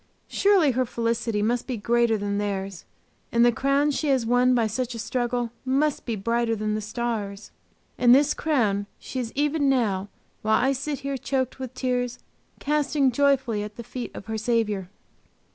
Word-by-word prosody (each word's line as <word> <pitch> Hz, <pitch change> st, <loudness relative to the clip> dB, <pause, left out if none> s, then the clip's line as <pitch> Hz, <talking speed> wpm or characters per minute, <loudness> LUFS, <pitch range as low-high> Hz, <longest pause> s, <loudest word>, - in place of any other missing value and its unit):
Surely 390 Hz, -8 st, +4 dB
her 255 Hz, +1 st, +1 dB
felicity 230 Hz, -2 st, -1 dB
must 235 Hz, +2 st, 0 dB
be 255 Hz, -3 st, -2 dB
greater 235 Hz, +1 st, +2 dB
than 200 Hz, 0 st, -2 dB
theirs, 195 Hz, -3 st, -3 dB, 0.5 s
and 235 Hz, 0 st, +4 dB
the 240 Hz, -, +5 dB
crown 275 Hz, +4 st, +2 dB
she 300 Hz, +2 st, -2 dB
has 265 Hz, -4 st, +2 dB
won 250 Hz, +2 st, +3 dB
by 235 Hz, -2 st, +2 dB
such 235 Hz, +3 st, -2 dB
a -, -, -5 dB
struggle 240 Hz, 0 st, -1 dB
must 275 Hz, +3 st, 0 dB
be 230 Hz, -, -1 dB
brighter 230 Hz, +3 st, 0 dB
than 215 Hz, 0 st, -2 dB
the 215 Hz, -, -1 dB
stars! 215 Hz, -2 st, -4 dB, 0.5 s
And 245 Hz, 0 st, +7 dB
this 290 Hz, +2 st, +4 dB
crown 215 Hz, -10 st, 0 dB
she 260 Hz, -, -6 dB
is 235 Hz, -2 st, -3 dB
even 290 Hz, 0 st, +1 dB
now, 205 Hz, -7 st, +1 dB, 0.3 s
while 220 Hz, 0 st, +3 dB
I 265 Hz, +3 st, +3 dB
sit 275 Hz, +1 st, -3 dB
here 275 Hz, 0 st, -3 dB
choked 260 Hz, 0 st, -2 dB
with 260 Hz, -1 st, -6 dB
tears, 250 Hz, -1 st, -1 dB, 0.4 s
casting 290 Hz, -2 st, +1 dB
joyfully 265 Hz, -4 st, +2 dB
at 210 Hz, 0 st, -6 dB
the 235 Hz, -, -7 dB
feet 245 Hz, +1 st, -6 dB
of -, -, -8 dB
her 220 Hz, 0 st, -3 dB
Saviour! 215 Hz, -5 st, 0 dB
240 Hz, 180 wpm, -25 LUFS, 220-265 Hz, 0.5 s, And